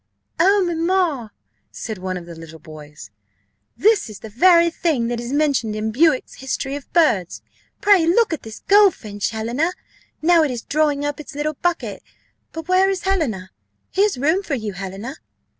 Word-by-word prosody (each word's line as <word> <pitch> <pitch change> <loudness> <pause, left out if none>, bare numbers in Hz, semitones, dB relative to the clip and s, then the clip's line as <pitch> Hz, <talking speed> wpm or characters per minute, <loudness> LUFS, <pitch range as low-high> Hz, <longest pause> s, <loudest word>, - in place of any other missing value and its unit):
"Oh, 390 +3 +4
mamma!" 335 - 0 0.4
said 220 -5 -7
one 185 0 -3
of 175 - -9
the 170 - -10
little 165 -1 -11
boys, 150 -1 -12 0.7
"this 430 - +3
is 210 - -11
the 220 - -9
very 340 - +5
thing 290 -9 0
that 240 -1 -2
is 240 +1 -5
mentioned 280 -7 +1
in 215 +1 -2
Bewick's 290 +3 +1
History 270 +1 -3
of 285 - -9
Birds. 225 - +1 0.4
Pray 390 -5 +5
look 425 +2 +3
at 315 - -4
this 220 0 -10
goldfinch, 355 - +3
Helena, 240 +10 -1 0.5
now 335 +1 +4
it 305 - +1
is 245 -3 -5
drawing 290 -1 0
up 290 0 -3
its 295 - -10
little 300 +1 -2
bucket 345 +3 -2 0.5
but 325 -1 -7
where 370 +1 +4
is 385 -2 -2
Helena? 260 - -1 0.4
here's 400 -4 +1
room 315 +9 +1
for 320 -8 -3
you, 215 -5 -4
Helena." 195 +9 -7
285 Hz, 170 wpm, -21 LUFS, 220-340 Hz, 0.7 s, very